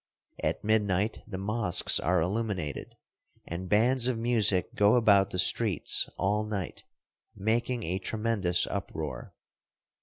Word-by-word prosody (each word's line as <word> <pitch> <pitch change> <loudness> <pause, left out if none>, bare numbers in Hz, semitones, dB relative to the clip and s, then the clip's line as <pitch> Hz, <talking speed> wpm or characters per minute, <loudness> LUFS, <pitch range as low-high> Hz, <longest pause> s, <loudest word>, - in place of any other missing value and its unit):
At - - -1
midnight 105 -1 0
the 100 -4 -6
mosques 100 -1 +1
are 90 +1 +1
illuminated, 95 - -3 0.5
and 90 +2 -6
bands 120 +5 +3
of 125 -3 0
music 115 -5 +1
go 105 +3 +4
about 100 -5 +4
the 90 - -5
streets 100 -2 +2
all 105 +3 0
night, 105 -4 -5 0.5
making 115 +3 -1
a 90 +3 -2
tremendous 105 -4 0
uproar. 80 -9 -6
105 Hz, 120 wpm, -28 LUFS, 90-115 Hz, 0.5 s, go